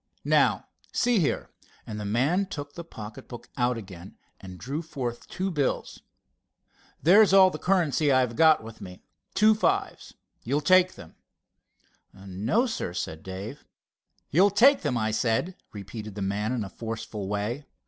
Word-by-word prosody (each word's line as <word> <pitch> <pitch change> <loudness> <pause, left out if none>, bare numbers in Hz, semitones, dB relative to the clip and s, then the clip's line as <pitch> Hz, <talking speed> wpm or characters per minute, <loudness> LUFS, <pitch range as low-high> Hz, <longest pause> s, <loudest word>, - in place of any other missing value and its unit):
Now, - - +3 0.3
see 240 -3 +2
here," 155 - -1 0.3
and 105 -1 -6
the 105 - -5
man 140 - +1
took 145 -5 -7
the 170 - -7
pocket 110 -9 -10
book 120 - -10
out 125 -2 +1
again 95 -4 -11 0.2
and 95 -1 -10
drew 140 - -4
forth 130 -7 -5
two 190 +1 -3
bills. 145 -5 -2 1.0
"There's 195 +4 +6
all 190 -1 +7
the - - -6
currency 165 -6 +2
I've 130 -3 +2
got 160 -3 +5
with 110 0 -11
me—two 190 - 0
fives. 215 - -1 0.3
You'll 140 +5 0
take 185 +3 +4
them." 80 - -14 1.0
"No, 100 - -1
sir," 220 - -4
began 80 -3 -5
Dave. 100 +9 -8 0.7
"You'll 185 +7 +5
take 250 +8 +5
them, 145 -6 -1
I 110 -1 0
said," 115 +11 0 0.2
repeated 105 +1 -8
the 100 - -3
man 105 +3 -1
in 125 -4 -1
a 100 - -7
forceful 110 -3 -6
way. 105 +8 -3
125 Hz, 150 wpm, -26 LUFS, 105-175 Hz, 1.0 s, all